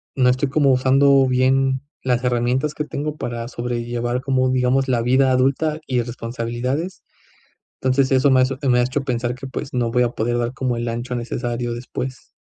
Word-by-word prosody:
no 130 Hz, -2 st, +4 dB
estoy 130 Hz, +2 st, +1 dB
como 140 Hz, -1 st, +3 dB
usando 135 Hz, +1 st, +4 dB
bien 130 Hz, +1 st, +2 dB, 0.2 s
las 125 Hz, -1 st, 0 dB
herramientas 125 Hz, +4 st, 0 dB
que 150 Hz, -, -3 dB
tengo 150 Hz, +1 st, -4 dB
para 120 Hz, -1 st, -4 dB
sobrellevar 120 Hz, 0 st, -3 dB
como, 130 Hz, -1 st, +1 dB
digamos, 130 Hz, +1 st, +2 dB
la 125 Hz, -2 st, +1 dB
vida 130 Hz, +2 st, +3 dB
adulta 135 Hz, +5 st, +1 dB
y 130 Hz, -, -1 dB
las 120 Hz, -1 st, 0 dB
responsabilidades. 125 Hz, +9 st, -4 dB, 0.8 s
Entonces, 130 Hz, +1 st, +2 dB
eso 135 Hz, +1 st, +4 dB
me 130 Hz, -, +5 dB
hace 130 Hz, +1 st, 0 dB
me 125 Hz, -, +4 dB
ha -, -, +4 dB
hecho 130 Hz, +3 st, -1 dB
pensar 120 Hz, -1 st, -1 dB
que, 130 Hz, +2 st, -8 dB
pues, 130 Hz, -, -6 dB
no 120 Hz, -2 st, 0 dB
voy 125 Hz, +1 st, +2 dB
a 120 Hz, -, 0 dB
poder 120 Hz, +1 st, -1 dB
dar 120 Hz, 0 st, -1 dB
como 130 Hz, -2 st, -1 dB
el 120 Hz, 0 st, -3 dB
ancho 120 Hz, +2 st, -3 dB
necesario 120 Hz, 0 st, -3 dB
después. 130 Hz, +1 st, -6 dB
130 Hz, 190 wpm, -21 LUFS, 120-135 Hz, 0.8 s, me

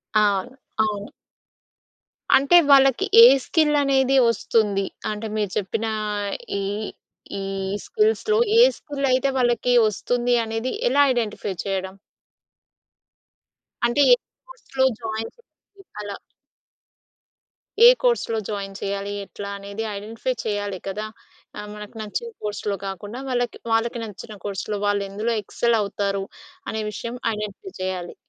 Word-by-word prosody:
అవును, 205 Hz, +2 st, +2 dB, 0.3 s
అవును. 210 Hz, -1 st, -1 dB, 1.3 s
అంటే 280 Hz, +6 st, +6 dB
వాళ్ళకి 270 Hz, -2 st, +6 dB, 0.2 s
ఏ -, -, +12 dB, 0.2 s
స్కిల్ 305 Hz, -3 st, +2 dB
అనేది 270 Hz, -1 st, +3 dB
వస్తుంది? 205 Hz, -3 st, +1 dB, 0.2 s
అంటే 215 Hz, +1 st, -4 dB
మీరు 205 Hz, -3 st, -1 dB
చెప్పిన 210 Hz, +3 st, -2 dB, 0.8 s
ఈ -, -, -2 dB, 0.8 s
ఈ -, -, -4 dB, 0.4 s
స్కిల్స్‌లో 435 Hz, 0 st, +1 dB, 0.2 s
ఏ -, -, +9 dB, 0.2 s
స్కిల్ 285 Hz, -2 st, -4 dB
అయితే 260 Hz, +2 st, +2 dB
వాళ్ళకి 245 Hz, 0 st, +2 dB
వస్తుంది 240 Hz, +4 st, 0 dB
అనేది, 225 Hz, +3 st, -3 dB, 0.2 s
ఎలా 285 Hz, -, +4 dB
ఐడెంటిఫై 210 Hz, -4 st, -2 dB
చేయడం? 190 Hz, -1 st, -3 dB, 1.9 s
అంటే, 240 Hz, +4 st, +2 dB
ఏ -, -, +8 dB, 0.3 s
కోర్స్‌లో 270 Hz, -, -2 dB, 0.2 s
జాయిన్ 220 Hz, 0 st, -4 dB
చెయ్యడం? 475 Hz, -, -28 dB, 0.5 s
అలా. 205 Hz, -1 st, -6 dB, 1.7 s
ఏ -, -, +12 dB
కోర్స్‌లో 475 Hz, -, +1 dB
జాయిన్ 200 Hz, -2 st, -4 dB
చేయాలి? 200 Hz, 0 st, -3 dB
ఎట్లా 200 Hz, +1 st, -8 dB
అనేది 200 Hz, +2 st, -6 dB
ఐడెంటిఫై 225 Hz, +5 st, -3 dB
చేయాలి 205 Hz, -2 st, -2 dB
కదా! 200 Hz, +2 st, -3 dB, 0.5 s
ఆహ్, 210 Hz, -, -6 dB
మనకు 210 Hz, +1 st, -10 dB
నచ్చిన 215 Hz, -, -4 dB
కోర్సులో 205 Hz, -1 st, -2 dB
కాకుండా 205 Hz, +5 st, -6 dB
వాళ్ళకి, 245 Hz, -2 st, -1 dB, 0.2 s
వాళ్ళకి 235 Hz, +1 st, +1 dB
నచ్చిన 210 Hz, 0 st, -9 dB
కోర్సులో 205 Hz, +1 st, -3 dB
వాళ్ళు 205 Hz, -1 st, +1 dB
ఎందులో 215 Hz, +4 st, -2 dB
ఎక్సెల్ 235 Hz, +3 st, +1 dB
అవుతారు? 200 Hz, -1 st, -2 dB, 0.5 s
అనే 220 Hz, -, -2 dB
విషయం 235 Hz, +3 st, -6 dB, 0.2 s
ఐడెంటిఫై 210 Hz, -, -6 dB
చేయాలి. 185 Hz, -2 st, -4 dB
215 Hz, 115 wpm, -23 LUFS, 200-250 Hz, 1.9 s, ఏ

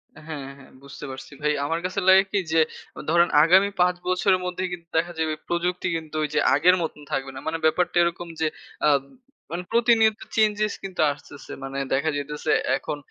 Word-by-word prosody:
অ্যাঁ 150 Hz, -, -14 dB
হ্যাঁ, 140 Hz, -4 st, -6 dB
হ্যাঁ। 135 Hz, -, -16 dB
বুঝতে 140 Hz, +1 st, -9 dB
পারছি 130 Hz, -, -9 dB
ভাই। 150 Hz, 0 st, +2 dB
আমার 165 Hz, +3 st, -1 dB
কাছে 185 Hz, +2 st, -2 dB
লাগে 190 Hz, +1 st, +8 dB
কি 205 Hz, -, +2 dB
যে 165 Hz, -, +4 dB, 0.5 s
ধরেন 170 Hz, +1 st, +4 dB, 0.2 s
আগামী 190 Hz, +4 st, +5 dB
৫ 180 Hz, 0 st, +3 dB
বছরের 185 Hz, +1 st, +2 dB
মধ্যে 180 Hz, +1 st, -3 dB
কিন্তু 170 Hz, -2 st, -7 dB
দেখা 170 Hz, +2 st, +1 dB
যাবে 160 Hz, -1 st, 0 dB
প্রযুক্তি 175 Hz, +1 st, -1 dB
কিন্তু 160 Hz, -1 st, -6 dB
ওই -, -, 0 dB
যে 150 Hz, -, +2 dB, 0.2 s
আগের 175 Hz, +6 st, +5 dB
মতন 160 Hz, -2 st, -4 dB
থাকবে 135 Hz, 0 st, -2 dB
না। -, -, -6 dB
মানে 160 Hz, +1 st, -1 dB
ব্যাপারটা 175 Hz, +3 st, +2 dB
এরকম 170 Hz, 0 st, -2 dB
যে 160 Hz, -, +2 dB, 0.4 s
আব 140 Hz, -2 st, +4 dB, 0.5 s
মানে 175 Hz, +2 st, -3 dB
প্রতিনিয়ত 230 Hz, -2 st, +4 dB, 0.2 s
চেঞ্জেস 215 Hz, -1 st, +2 dB
কিন্তু 190 Hz, -2 st, -3 dB
আসতেছে। 145 Hz, 0 st, -11 dB
মানে 135 Hz, 0 st, -5 dB, 0.2 s
দেখা 140 Hz, +4 st, +1 dB
যাইতেছে 145 Hz, +1 st, -3 dB, 0.3 s
এখন 150 Hz, -, -5 dB
170 Hz, 190 wpm, -24 LUFS, 150-185 Hz, 0.5 s, লাগে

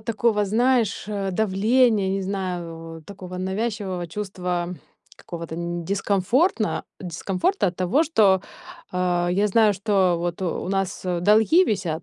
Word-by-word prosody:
такого, 215 Hz, -1 st, +1 dB
знаешь, 235 Hz, +1 st, +1 dB
э, 200 Hz, -2 st, -2 dB
давления, 215 Hz, +2 st, +2 dB
не 195 Hz, +1 st, -1 dB
знаю, 175 Hz, -4 st, -5 dB
в -, -, -22 dB
такого 185 Hz, 0 st, -9 dB
навязчивого 190 Hz, -1 st, -3 dB
чувства 180 Hz, -2 st, -3 dB, 0.4 s
какого-то 170 Hz, -2 st, -7 dB
н 170 Hz, +1 st, -3 dB
не 170 Hz, -, -8 dB
дискомфортно 205 Hz, -, +1 dB
дискомфорта 190 Hz, -, -1 dB
от 180 Hz, -1 st, -2 dB
того, 185 Hz, -, +2 dB
что, 210 Hz, -, +3 dB, 0.5 s
а, 180 Hz, -1 st, 0 dB
я 200 Hz, +4 st, +2 dB
знаю, 215 Hz, 0 st, +4 dB
что 190 Hz, -3 st, +2 dB
вот 175 Hz, +1 st, -3 dB
у 180 Hz, -1 st, -2 dB
нас, 195 Hz, -1 st, -2 dB
э, 180 Hz, -2 st, -1 dB
долги 220 Hz, -, +5 dB
висят, 175 Hz, -, -2 dB
190 Hz, 140 wpm, -23 LUFS, 180-215 Hz, 0.5 s, долги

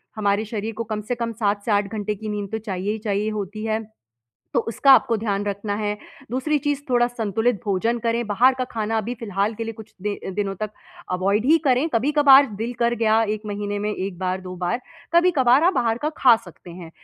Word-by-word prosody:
हमारे 210 Hz, 0 st, +1 dB
शरीर 220 Hz, +1 st, -4 dB
को 230 Hz, +2 st, -4 dB
कम 215 Hz, -1 st, -4 dB
से 245 Hz, -, -1 dB
कम 235 Hz, -1 st, -3 dB
7 205 Hz, -2 st, +1 dB
से 220 Hz, -, -1 dB
8 205 Hz, -1 st, +2 dB
घंटे 210 Hz, 0 st, -2 dB
की 215 Hz, +1 st, -7 dB
नींद 205 Hz, -2 st, -4 dB
तो 220 Hz, -, -1 dB
चाहिए 200 Hz, -2 st, -3 dB
ही 220 Hz, -, -2 dB
चाहिए 210 Hz, 0 st, -1 dB
होती 210 Hz, 0 st, -5 dB
है। 220 Hz, 0 st, -1 dB, 0.7 s
तो 240 Hz, -, +4 dB
उसका 270 Hz, +4 st, +5 dB
आपको 230 Hz, -3 st, +4 dB
ध्यान 205 Hz, -2 st, -2 dB
रखना 205 Hz, 0 st, -3 dB
है, 210 Hz, 0 st, -2 dB, 0.3 s
दूसरी 265 Hz, +5 st, 0 dB
चीज़ 290 Hz, -1 st, 0 dB
थोड़ा 240 Hz, -1 st, +3 dB
संतुलित 225 Hz, -2 st, -1 dB
भोजन 220 Hz, +4 st, 0 dB
करें, 230 Hz, 0 st, -1 dB
बाहर 245 Hz, +6 st, +4 dB
का 255 Hz, -, -2 dB
खाना 225 Hz, 0 st, -1 dB
अभी 230 Hz, +3 st, -3 dB
फ़िलहाल 205 Hz, 0 st, -1 dB
के 230 Hz, -, -4 dB
लिए 225 Hz, -, -4 dB
कुछ 220 Hz, 0 st, -13 dB
दि 205 Hz, 0 st, -2 dB, 0.2 s
दिनों 200 Hz, -1 st, -1 dB
तक 215 Hz, -1 st, -2 dB, 0.4 s
अवॉइड 200 Hz, +5 st, +1 dB
ही 320 Hz, +3 st, +6 dB
करें। 260 Hz, +4 st, +3 dB
कभी-कभार 280 Hz, +2 st, +6 dB
दिल 230 Hz, +3 st, -3 dB
कर 235 Hz, 0 st, +2 dB
गया 225 Hz, -1 st, +3 dB
1 215 Hz, -, -8 dB
महीने 205 Hz, 0 st, -3 dB
में 210 Hz, +1 st, -2 dB
1 185 Hz, -1 st, -5 dB
बार 185 Hz, 0 st, -2 dB
2 185 Hz, -1 st, -8 dB
बार, 180 Hz, +7 st, -1 dB, 0.3 s
कभी-कभार 300 Hz, -6 st, +4 dB
आप 365 Hz, -, +5 dB
बाहर 235 Hz, -2 st, +1 dB
का 300 Hz, -, +1 dB
खा 250 Hz, -3 st, +6 dB
सकते 175 Hz, 0 st, -13 dB
हैं। 170 Hz, -1 st, -10 dB
220 Hz, 220 wpm, -23 LUFS, 205-240 Hz, 0.7 s, ही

